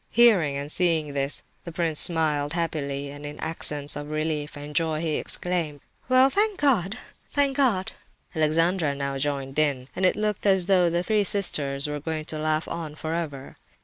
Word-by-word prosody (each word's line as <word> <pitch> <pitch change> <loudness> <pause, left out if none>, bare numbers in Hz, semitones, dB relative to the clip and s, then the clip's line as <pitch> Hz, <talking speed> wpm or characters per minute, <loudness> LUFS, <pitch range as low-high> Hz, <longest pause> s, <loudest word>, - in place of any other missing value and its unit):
Hearing 195 -12 +4
and 140 +1 -3
seeing 160 -5 +2
this, 140 +1 +2 0.2
the 170 - -8
prince 160 -2 0
smiled 150 -3 +3
happily, 145 -4 -3
and 145 +1 -10
in 145 0 -8
accents 150 -3 0
of 145 0 -6
relief 155 -1 -3
and 145 +1 -9
joy, 160 0 +1
he 160 -2 -1
exclaimed 170 -5 -1 0.3
"Well, 255 +1 +6
thank 415 +1 0
God—thank 270 +3 -1
God!" 230 -10 +1 0.4
Alexandra 160 0 +1
now 140 -1 -3
joined 140 0 -2
in, 140 -4 0
and 190 - -3
it 185 - +4
looked 210 -1 -2
as 190 -2 +4
though 180 -2 +3
the 170 +1 -1
three 210 +2 +1
sisters 145 -9 +2
were 150 0 -3
going 155 +1 -4
to 155 -1 -4
laugh 155 +1 -1
on 160 -3 -6
for 160 +1 -4
ever. 145 -5 -5
155 Hz, 175 wpm, -25 LUFS, 145-180 Hz, 0.4 s, Well